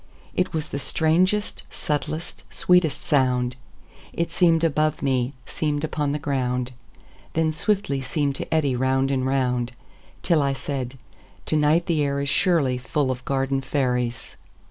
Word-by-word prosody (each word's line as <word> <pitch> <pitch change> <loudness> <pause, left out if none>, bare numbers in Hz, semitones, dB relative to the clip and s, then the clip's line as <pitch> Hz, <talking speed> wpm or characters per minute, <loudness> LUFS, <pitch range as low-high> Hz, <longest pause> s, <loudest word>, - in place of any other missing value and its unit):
It 180 - 0
was 155 -2 -3
the 140 - -3
strangest, 175 +9 +1
subtlest, 155 +3 -4
sweetest 180 -6 +3
sound:It 125 +4 -2
seem'd 165 -2 +3
above 155 -1 +1
me, 130 -1 +1
seem'd 150 -1 -2
upon 150 -2 -1
the 145 - 0
ground, 130 -4 -1 0.6
Then 160 -1 +1
swiftly 195 -7 0
seem'd 140 +2 0
to - - -6
eddy 145 -5 +2
round 130 +2 +1
and 130 -1 0
round, 125 -2 0 0.5
Till 165 -4 +3
I 140 -1 +1
said: 135 -2 -4 0.5
"To - - 0
night 155 +3 +3
the 160 -3 +1
air 140 -1 0
isSurely 140 -2 +2
full 130 +1 0
of 125 0 -5
garden 135 0 0
fairies." 125 -4 -1
140 Hz, 140 wpm, -24 LUFS, 130-160 Hz, 0.6 s, sweetest